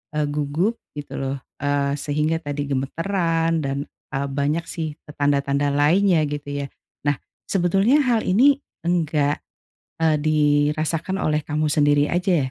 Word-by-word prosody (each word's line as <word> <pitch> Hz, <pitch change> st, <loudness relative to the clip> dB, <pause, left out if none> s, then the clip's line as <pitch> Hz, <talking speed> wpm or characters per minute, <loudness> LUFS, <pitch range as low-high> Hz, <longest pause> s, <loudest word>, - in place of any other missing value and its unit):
eee, 150 Hz, 0 st, +1 dB
gugup 150 Hz, +10 st, 0 dB, 0.2 s
gitu 145 Hz, -1 st, -6 dB
loh, 135 Hz, 0 st, -2 dB, 0.2 s
eee, 145 Hz, 0 st, 0 dB
sehingga 150 Hz, +3 st, 0 dB
tadi 145 Hz, -2 st, -4 dB
gemetaran 165 Hz, +4 st, 0 dB
dan, 135 Hz, 0 st, -2 dB, 0.4 s
eee, 140 Hz, +1 st, -1 dB
banyak 145 Hz, +4 st, -1 dB
sih 160 Hz, -2 st, -4 dB
e 150 Hz, -, -15 dB
tanda-tanda 140 Hz, 0 st, +1 dB
lainnya 165 Hz, +4 st, +4 dB
gitu 145 Hz, 0 st, -5 dB, 0.2 s
ya, -, -, -7 dB, 0.4 s
nah 145 Hz, -2 st, +2 dB, 0.3 s
sebetulnya 195 Hz, -, +3 dB
hal 240 Hz, -4 st, +2 dB
ini 265 Hz, +9 st, +5 dB, 0.3 s
enggak, 155 Hz, -4 st, +1 dB, 0.6 s
eee, 155 Hz, -1 st, +4 dB
dirasakan 155 Hz, +4 st, +1 dB
oleh 150 Hz, 0 st, +2 dB
kamu 155 Hz, +1 st, 0 dB
sendiri 145 Hz, -1 st, +3 dB
aja 175 Hz, -7 st, +1 dB
150 Hz, 135 wpm, -22 LUFS, 145-170 Hz, 0.6 s, ini